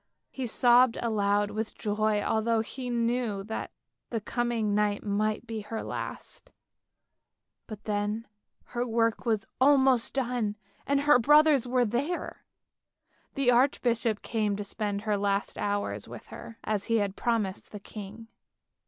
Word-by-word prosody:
He 260 -2 -4
sobbed 245 +1 +5
aloud 205 -2 +1
with 215 +1 -4
joy 210 0 0
although 225 0 +1
he 250 +3 -6
knew 235 -3 0
that 220 +2 -5 0.4
the 230 - -2
coming 230 -1 -1
night 205 0 +1
might 215 +2 -1
be 225 -2 -5
her 220 +2 -5
last, - - -6 1.2
but 215 -1 -9
then 210 +1 -2 0.5
her 240 0 0
work 230 0 0
was 220 -3 +1
almost 265 -3 +4
done 240 -5 -1 0.3
and 280 0 +2
her 290 -3 +5
brothers 295 0 +5
were 250 0 +2
there. 270 +11 -3 0.9
The 270 -3 +3
archbishop 240 -3 +2
came 215 -3 0
to 205 - -4
spend 205 0 -3
her 210 -2 +1
last 200 0 0
hours 205 0 -2
with - - -10
her 230 - -10
as 210 -2 -1
he 230 - +1
had 200 -2 -1
promised 215 -5 -1
the 210 - -7
king. 210 +2 -9
225 Hz, 140 wpm, -28 LUFS, 210-245 Hz, 1.2 s, sobbed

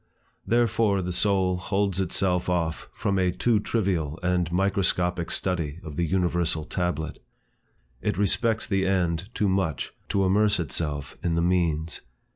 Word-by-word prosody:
Therefore 115 -4 +2
the 90 - -3
soul 95 -1 +2
holds 95 0 0
itself 90 0 0
off 85 -3 -1
from 100 -1 -1
a 90 -1 +2
too 115 +4 +2
trivial 90 -9 -1
and 90 -2 +1
microscopic 90 -2 +1
study 85 -4 -1
of 75 -2 -7
the 85 +2 0
universal 85 -3 0
tablet. 85 -3 -3 0.8
It - - -1
respects 110 +3 +1
the 95 -2 0
end 90 -1 0
too 105 - +1
much, 95 -5 -1 0.2
to 100 -1 +2
immerse 105 +2 +3
itself 75 -2 -3
in 85 -2 0
the 85 - +1
means. 85 -3 0
90 Hz, 140 wpm, -26 LUFS, 85-100 Hz, 0.8 s, immerse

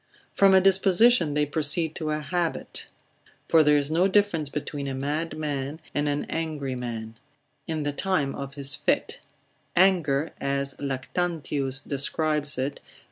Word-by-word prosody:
From 195 -1 +5
a 190 - +6
disposition 195 -2 +4
they 150 0 +2
proceed 155 +2 +2
to 155 -2 -3
an 155 0 -2
habit, 175 +1 -3 0.6
for 165 - +5
there 150 -1 +4
is 145 +1 -1
no 175 +4 +3
difference 190 -7 +1
between 145 -1 -4
a 135 - -3
mad 150 +5 -3
man, 145 -1 -3
and 145 0 0
an 145 0 -1
angry 150 -5 -3
man, 115 -2 -6 0.5
in 155 -2 -2
the 145 0 -2
time 165 -5 0
of 140 0 -7
his 140 -1 0
fit; - - -1 0.6
anger, 165 -5 +3
as 140 0 -1
Lactantius 140 -1 -2
describes 150 +1 0
it, 135 +2 -2
L. - - -23
150 Hz, 150 wpm, -26 LUFS, 140-165 Hz, 0.6 s, a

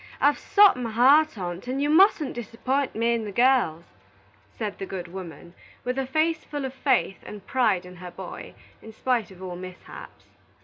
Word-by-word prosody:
I've 290 0 +3
sot 405 -7 +5
my 245 -2 -3
heart 270 +5 +4
on't, 180 +3 -5
and 260 +2 -2
you 285 - +1
musn't 315 -3 +4
disapp'int 250 +4 -2
me 230 +2 +1
and 225 -2 -2
the - - -5
girls," 235 -9 +2 0.6
said 210 -3 -6
the 195 - -5
good 180 -2 -6
woman, 175 -2 -10 0.3
with 250 +2 -2
a 265 - -2
face 315 +4 0
full 290 -2 -5
of 260 - -5
faith 260 -8 0
and 205 -2 -10
pride 215 -9 +1
in 180 0 -12
her 180 0 -8
boy, 175 +1 -9 0.3
in 220 - -12
spite 235 -3 -1
of 190 -1 -13
all 180 -1 -6
mishaps. 185 0 -11
230 Hz, 185 wpm, -25 LUFS, 185-270 Hz, 0.6 s, sot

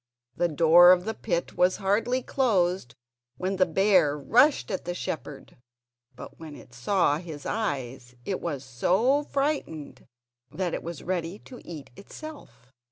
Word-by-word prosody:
The 175 - +1
door 170 +3 +7
of 180 0 +3
the 220 - -2
pit 175 -7 -3
was 180 +1 +3
hardly 230 +6 0
closed 185 - 0 0.4
when 190 +1 -2
the 185 -1 +3
bear 175 -4 +3
rushed 240 - +3
at 190 - -4
the 175 0 -3
shepherd; 150 -6 -6 0.6
but - - -11
when 155 -2 -9
it 120 - -15
saw 150 +4 +1
his 160 -4 -9
eyes 130 - -3
it 190 - -3
was 145 -6 -4
so 190 - +2
frightened 275 - -3 0.4
that 180 +4 -3
it - - -3
was 170 -3 -7
ready 175 +1 -3
to 250 +3 -13
eat 150 -6 -9
itself. 200 - -12
175 Hz, 150 wpm, -26 LUFS, 145-205 Hz, 0.6 s, door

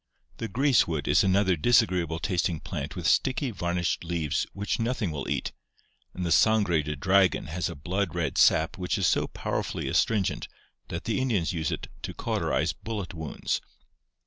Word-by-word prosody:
The 115 - -3
greasewood 115 - +2
is - - +4
another 95 -1 +3
dis 120 +9 +5
agreeable 85 -5 -2
tasting 85 -2 -1
plant - - -5
with - - -5
sticky 130 -1 +2
varnished 85 -3 -1
leaves 80 -3 -1
which 100 +3 -2
nothing 115 -5 -1
will 70 -3 -4
eat, - - -1 0.6
and 90 - -3
the 85 - -1
sangre 100 -3 +4
de 75 +1 -4
dragon 95 +4 +3
has 85 +2 -2
a - - -6
blood 85 +4 -2
red 80 -5 -1
sap 80 +4 +4
which 90 +3 -1
is 95 - +1
so - - +2
powerfully - - -3
astringent 105 -4 +1 0.4
that 85 - -5
the 115 +3 -1
Indians 105 -10 0
use 80 -2 -1
it - - -4
to - - -6
cauterize - - 0
bullet 105 -4 -5
wounds. 80 -3 -3
90 Hz, 170 wpm, -27 LUFS, 80-105 Hz, 0.6 s, dis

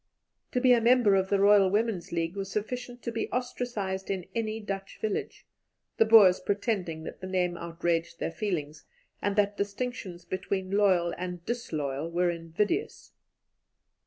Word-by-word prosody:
To 250 - +2
be 250 0 +6
a 235 - +4
member 235 -3 +5
of 190 0 +2
the 200 - +3
Loyal 200 -1 +6
Women's 205 -3 -1
League 165 +1 -2
was 195 -1 -4
sufficient 245 +3 -4
to 235 - -3
be 225 0 -3
ostracized 240 -6 -3
in 190 -3 -2
any 220 -1 -2
Dutch 195 -2 -6
village, 215 -2 -3 0.5
the 225 - +5
Boers 210 -5 +7
pretending 195 -6 -2
that - - -8
the 185 - -5
name 180 -2 0
outraged 170 0 -2
their - - -2
feelings, 160 -5 -3 0.4
and 205 -1 0
that 205 -1 +2
distinctions 200 -4 -4
between 190 0 -3
loyal 190 -4 +3
and 180 -1 -5
disloyal 155 - -3
were 175 +1 +1
invidious. 170 - -2
195 Hz, 155 wpm, -28 LUFS, 175-220 Hz, 0.5 s, Boers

